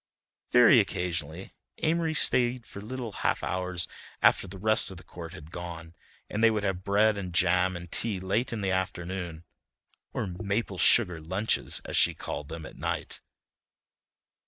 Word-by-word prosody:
Very -, -, +7 dB
occasionally 85 Hz, 0 st, -3 dB, 0.3 s
Amory 160 Hz, 0 st, +1 dB
stayed 125 Hz, -4 st, +4 dB
for 100 Hz, -, -9 dB
little 120 Hz, +1 st, -5 dB
half -, -, -1 dB
hours 90 Hz, -1 st, -2 dB, 0.3 s
after -, -, +4 dB
the 95 Hz, +1 st, -9 dB
rest 110 Hz, +3 st, +3 dB
of 95 Hz, -, -9 dB
the 90 Hz, -, -12 dB
court 85 Hz, -2 st, -9 dB
had 80 Hz, -3 st, -11 dB
gone, 85 Hz, -2 st, -7 dB, 0.3 s
and 105 Hz, +2 st, -2 dB
they 115 Hz, -, +8 dB
would 110 Hz, -2 st, -1 dB
have 95 Hz, -2 st, -2 dB
bread 105 Hz, +1 st, +3 dB
and 90 Hz, -2 st, -5 dB
jam 90 Hz, +1 st, +3 dB
and 90 Hz, -1 st, -10 dB
tea 105 Hz, -5 st, +1 dB
late 100 Hz, +7 st, -1 dB
in 115 Hz, -3 st, -3 dB
the 95 Hz, -1 st, 0 dB
afternoon 90 Hz, -2 st, -3 dB, 0.7 s
or -, -, -2 dB
"maple 100 Hz, +1 st, -3 dB
sugar 90 Hz, -9 st, +4 dB
lunches," 95 Hz, +7 st, -1 dB
as -, -, -4 dB
she -, -, +4 dB
called 75 Hz, -, -6 dB
them, 80 Hz, -1 st, -7 dB
at -, -, -11 dB
night. -, -, -3 dB
95 Hz, 160 wpm, -28 LUFS, 90-110 Hz, 0.7 s, they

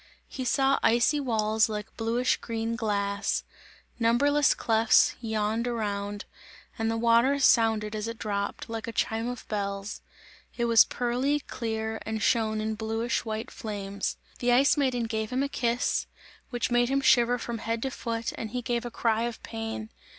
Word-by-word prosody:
He 260 Hz, -, -5 dB
saw 270 Hz, +2 st, +3 dB
icy 240 Hz, +6 st, +3 dB
walls 220 Hz, -4 st, +1 dB
like 210 Hz, 0 st, -5 dB
bluish 235 Hz, +3 st, +1 dB
green 230 Hz, 0 st, -3 dB
glass, 200 Hz, -3 st, -1 dB, 0.6 s
numberless 280 Hz, +5 st, +3 dB
clefts 225 Hz, 0 st, +4 dB
yawned 220 Hz, +1 st, -1 dB
around, 205 Hz, -3 st, -3 dB, 0.5 s
and 225 Hz, 0 st, +1 dB
the 225 Hz, -, 0 dB
water 235 Hz, +4 st, +4 dB
sounded 225 Hz, -5 st, +3 dB
as 215 Hz, +1 st, -3 dB
it 230 Hz, 0 st, -5 dB
dropped, 200 Hz, 0 st, -3 dB
like 225 Hz, -1 st, -5 dB
a -, -, -3 dB
chime 225 Hz, +1 st, -1 dB
of 245 Hz, -1 st, -6 dB
bells; 200 Hz, -1 st, -3 dB, 0.6 s
it 235 Hz, -, +1 dB
was 230 Hz, -1 st, +7 dB
pearly, 255 Hz, +4 st, 0 dB
clear 220 Hz, -3 st, -4 dB
and 220 Hz, 0 st, -3 dB
shone 220 Hz, -2 st, +2 dB
in 220 Hz, 0 st, -1 dB
bluish 225 Hz, +2 st, -2 dB
white 220 Hz, +1 st, -4 dB
flames. 200 Hz, -3 st, -4 dB, 0.2 s
The 245 Hz, 0 st, +2 dB
Ice 270 Hz, +4 st, +5 dB
Maiden 260 Hz, -5 st, +1 dB
gave 220 Hz, -1 st, -2 dB
him 255 Hz, +2 st, 0 dB
a -, -, 0 dB
kiss, 240 Hz, -3 st, 0 dB, 0.4 s
which 245 Hz, -1 st, -2 dB
made 240 Hz, 0 st, +3 dB
him 275 Hz, +1 st, +1 dB
shiver 245 Hz, -2 st, +4 dB
from 235 Hz, -1 st, -5 dB
head 230 Hz, +1 st, -2 dB
to 270 Hz, -, -2 dB
foot 230 Hz, -1 st, -3 dB
and 220 Hz, -, -5 dB
he 245 Hz, +2 st, -4 dB
gave 240 Hz, -1 st, -1 dB
a -, -, -3 dB
cry 230 Hz, -1 st, 0 dB
of 235 Hz, -1 st, -6 dB
pain. 225 Hz, -1 st, -5 dB
230 Hz, 165 wpm, -28 LUFS, 220-245 Hz, 0.6 s, was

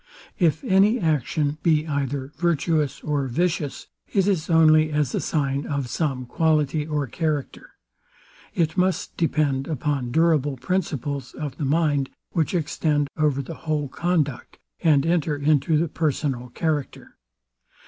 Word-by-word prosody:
If 160 Hz, -4 st, +2 dB
any 200 Hz, +5 st, +4 dB
action 150 Hz, -2 st, 0 dB
be 155 Hz, -2 st, +2 dB
either 140 Hz, -2 st, -2 dB
virtuous 160 Hz, -2 st, 0 dB
or 145 Hz, -3 st, -1 dB
vicious, 155 Hz, +1 st, -1 dB, 0.3 s
it 195 Hz, -3 st, +2 dB
is 185 Hz, -5 st, 0 dB
only 155 Hz, -1 st, +5 dB
as 150 Hz, -3 st, 0 dB
a -, -, 0 dB
sign 140 Hz, -2 st, -1 dB
of 140 Hz, -4 st, -2 dB
some 135 Hz, -5 st, -2 dB
quality 155 Hz, +1 st, +1 dB
or 150 Hz, -2 st, -1 dB
character. 150 Hz, +2 st, -3 dB, 0.8 s
It 160 Hz, -2 st, +1 dB
must 185 Hz, 0 st, 0 dB
depend 145 Hz, -5 st, 0 dB
upon 140 Hz, -4 st, -2 dB
durable 150 Hz, -2 st, +2 dB
principles 145 Hz, -5 st, -3 dB
of 145 Hz, -3 st, -5 dB
the 150 Hz, -, -2 dB
mind, 145 Hz, -2 st, +1 dB, 0.2 s
which 165 Hz, +1 st, 0 dB
extend 150 Hz, -3 st, 0 dB
over 145 Hz, -3 st, +1 dB
the 165 Hz, -, -7 dB, 0.2 s
whole 150 Hz, -3 st, 0 dB
conduct, 155 Hz, -5 st, -1 dB, 0.2 s
and 150 Hz, -4 st, +4 dB
enter 165 Hz, -3 st, +1 dB
into 145 Hz, +1 st, +2 dB
the 165 Hz, +3 st, +1 dB
personal 140 Hz, -5 st, -2 dB
character. 150 Hz, +1 st, -3 dB
150 Hz, 135 wpm, -24 LUFS, 140-160 Hz, 0.8 s, only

